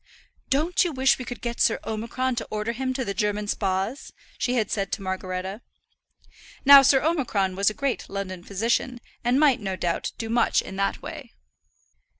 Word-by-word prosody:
"Don't 320 +8 +2
you 350 - -1
wish 265 -2 +2
we 255 - -5
could 245 - -7
get 235 0 -3
Sir 225 - +3
Omicron 235 +4 -2
to 225 - -3
order 215 +2 -2
him 260 +2 -2
to 260 -1 -2
the 200 - -2
German 210 +1 -1
Spas?" 195 +6 -2 0.3
she 250 - 0
had 220 -4 0
said 195 -2 -1
to - - -2
Margaretta. 190 +2 -4 1.0
Now 280 0 +11
Sir 270 0 +4
Omicron 235 - 0
was 200 +1 0
the 215 - +3
great 275 -2 -2
London 185 -3 -5
physician, 235 +5 -1 0.2
and 245 +3 +2
might, 290 -4 +4
no 195 -3 -3
doubt, 175 -2 -2
do 225 - -4
much 230 +1 +2
in 190 - -8
that 195 0 -1
way. - - -9
225 Hz, 180 wpm, -25 LUFS, 195-260 Hz, 1.0 s, Now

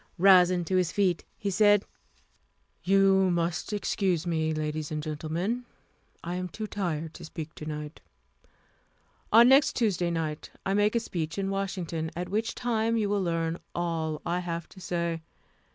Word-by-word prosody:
Rising 180 -1 +6
to 185 +2 +1
his 180 -1 +1
feet, 190 -4 +1
he 200 - -2
said: 205 0 +4 1.0
"You 195 0 +4
must 175 +2 -1
excuse 190 -4 0
me, 160 -2 0
ladies 155 0 -2
and 150 -1 -3
gentlemen. 165 +10 -2 0.6
I 175 - -4
am 180 0 -3
too 215 +6 -5
tired 165 -6 -3
to - - -10
speak 160 0 -7
to 155 - -8
night. 150 0 -6 1.3
On 230 +2 +8
next 270 +2 +5
Tuesday 190 -7 +1
night 160 -2 -3 0.2
I 195 - +1
make 205 +2 +2
a - - +4
speech 165 -6 -4
in 195 0 -1
Washington, 180 -5 -3
at 180 +1 -4
which 220 +3 -1
time 230 -1 0
you 210 -2 0
will 205 -1 +1
learn 165 -1 -1 0.2
all 165 -3 -2
I 175 +1 0
have 170 -2 -4
to 190 - -14
say. 170 -2 -2
180 Hz, 160 wpm, -28 LUFS, 165-200 Hz, 1.3 s, On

